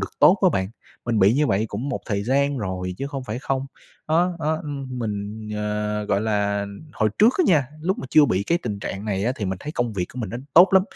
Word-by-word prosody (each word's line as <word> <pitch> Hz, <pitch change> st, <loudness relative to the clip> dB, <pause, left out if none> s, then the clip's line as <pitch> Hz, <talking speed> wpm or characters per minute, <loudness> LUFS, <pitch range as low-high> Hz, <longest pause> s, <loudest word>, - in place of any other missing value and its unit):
được -, -, -3 dB
tốt 190 Hz, -, +7 dB
á 185 Hz, -, +7 dB
bạn. 95 Hz, -4 st, 0 dB, 0.4 s
Mình 115 Hz, -2 st, +1 dB
bị 100 Hz, +4 st, +5 dB
như 150 Hz, +1 st, +2 dB
vậy 105 Hz, -2 st, +1 dB
cũng 115 Hz, +8 st, -4 dB
một 140 Hz, -, -3 dB
thời 100 Hz, -2 st, -1 dB
gian 140 Hz, +3 st, +1 dB
rồi 90 Hz, -3 st, -3 dB
chứ 140 Hz, -, -3 dB
không 135 Hz, -2 st, -5 dB
phải 115 Hz, -1 st, -4 dB
không. 135 Hz, 0 st, -2 dB, 0.4 s
Đó, 175 Hz, +3 st, +2 dB
đó, 155 Hz, 0 st, 0 dB
ưm, 135 Hz, -4 st, -5 dB
mình, 105 Hz, -1 st, -4 dB
ờ, 105 Hz, 0 st, -2 dB
gọi 100 Hz, 0 st, +1 dB
là, 100 Hz, -2 st, 0 dB, 0.3 s
hồi 110 Hz, 0 st, +1 dB
trước 225 Hz, +4 st, +6 dB
á 365 Hz, -, +5 dB
nha, 150 Hz, -7 st, +4 dB
lúc 185 Hz, +5 st, -1 dB
mà -, -, -5 dB
chưa 155 Hz, -, +7 dB
bị 100 Hz, -8 st, +1 dB
cái 170 Hz, +11 st, +1 dB
tình 105 Hz, -, -4 dB
trạng 100 Hz, +1 st, -5 dB
này 100 Hz, -2 st, -1 dB
á 120 Hz, -, +1 dB
thì 105 Hz, -, -3 dB
mình 95 Hz, -1 st, -2 dB
thấy 150 Hz, -, -6 dB
công 120 Hz, -7 st, -1 dB
việc 90 Hz, -3 st, -2 dB
của 130 Hz, -, -8 dB
mình 105 Hz, -, -4 dB
nó 120 Hz, -, -4 dB, 0.2 s
tốt 175 Hz, +4 st, +9 dB
lắm, 190 Hz, -1 st, +6 dB
115 Hz, 255 wpm, -23 LUFS, 100-145 Hz, 0.4 s, tốt